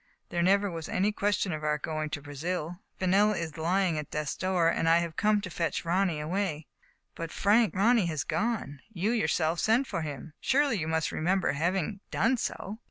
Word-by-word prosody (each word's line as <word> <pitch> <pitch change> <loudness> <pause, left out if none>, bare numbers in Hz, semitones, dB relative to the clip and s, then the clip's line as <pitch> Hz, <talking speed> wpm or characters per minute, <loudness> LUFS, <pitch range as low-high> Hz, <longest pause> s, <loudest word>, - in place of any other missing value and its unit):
There 175 - -1
never 200 +2 +3
was 165 -2 -6
any 200 +3 +1
question 205 -2 0
of 155 0 -5
our 150 0 +1
going 155 0 -3
to 145 -1 -5
Brazil, 165 +4 -4 0.2
Fenella 195 +2 +3
is 160 -2 -4
lying 170 0 +1
at 150 - -6
death's 150 -1 -3
door, 185 -3 +1
and 165 0 +2
I 165 - +6
have 170 -1 -2
come 215 0 +3
here 205 - +1
to 190 - -6
fetch 170 +1 -2
Ronny 175 -2 +1
away." 160 -1 -2 0.2
" - - -41
But, 165 -1 -5
Frank, 210 +2 +3
Ronny 215 0 +4
has 155 -5 -2
gone. 200 - -2
You 200 +2 0
yourself 170 -8 +1
sent 230 +5 +3
for 170 - -3
him. 150 0 -6
Surely 275 -5 +2
you 155 - -2
must 160 0 0
remember 185 +4 +1
having 180 +6 -1
done 250 +3 +2
so.' 215 -1 -4
175 Hz, 200 wpm, -29 LUFS, 160-200 Hz, 0.2 s, I